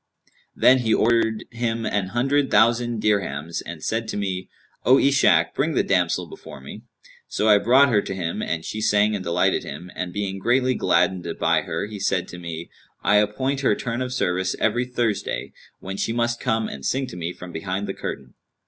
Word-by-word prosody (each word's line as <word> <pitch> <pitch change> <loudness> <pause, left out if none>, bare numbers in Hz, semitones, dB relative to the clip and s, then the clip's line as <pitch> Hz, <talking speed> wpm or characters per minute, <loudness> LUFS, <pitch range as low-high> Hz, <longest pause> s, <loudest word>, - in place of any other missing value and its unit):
Then 130 +1 +5
he 115 -3 +2
ordered 110 -1 +2
him 115 -1 -2
an 100 -2 -1
hundred 135 +6 +1
thousand 115 +1 +3
dirhams 85 -6 -1
and 85 -2 -8
said 110 0 -1
to 110 - -4
me, 95 -2 -3 0.3
'O 130 +2 +6
Ishak, 140 0 +4
bring - - 0
the - - +3
damsel - - +1
before - - -11
me.' 65 - -10 0.5
So 105 - -1
I 105 -1 +6
brought 130 +6 +5
her 105 -4 +3
to 95 - -5
him, 85 -3 -3
and 80 -1 -3
she 110 - -4
sang 105 0 +3
and 100 -3 -3
delighted 85 0 +1
him; 85 +6 -8
and 90 -1 -4
being 95 0 -3
greatly 125 +4 +2
gladdened 90 -2 +1
by - - +2
her - - -3
he 105 -1 -8
said 95 -2 0
to 90 - -9
me, 85 -1 -7 0.3
'I 105 +1 +4
appoint 120 +7 0
her 130 - +3
turn 120 +3 -3
of 125 0 -3
service 95 -6 0
every 120 +3 +1
Thursday, 120 -4 -2 0.3
when 95 +1 -6
she 115 - -1
must 120 0 0
come 110 -3 0
and 70 - -8
sing 130 - 0
to 105 - -9
me 85 0 -3
from 90 0 -10
behind 95 +4 -3
the - - -4
curtain.' - - -6
105 Hz, 195 wpm, -23 LUFS, 90-120 Hz, 0.5 s, O